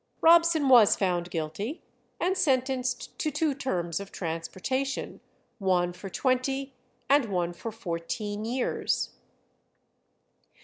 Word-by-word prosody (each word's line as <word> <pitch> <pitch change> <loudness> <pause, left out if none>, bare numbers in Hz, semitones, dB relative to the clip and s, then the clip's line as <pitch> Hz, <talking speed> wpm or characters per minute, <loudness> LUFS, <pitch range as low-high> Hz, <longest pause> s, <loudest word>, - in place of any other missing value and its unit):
Robson 335 -3 +5
was 240 -6 +7
found 180 -2 0
guilty, 175 - -4 0.4
and 370 +2 +1
sentenced 260 -6 0
to 310 - 0
two 300 0 0
terms 180 - -2
of 200 -1 -8
transportation, 190 - -3 0.4
one 180 -3 +1
for 185 +2 -8
twenty 265 +4 0 0.3
and 280 -2 +4
one 175 -4 -1
for 225 +6 -6
fourteen 205 +1 -4
years. 245 +3 -1
230 Hz, 105 wpm, -28 LUFS, 180-270 Hz, 0.4 s, was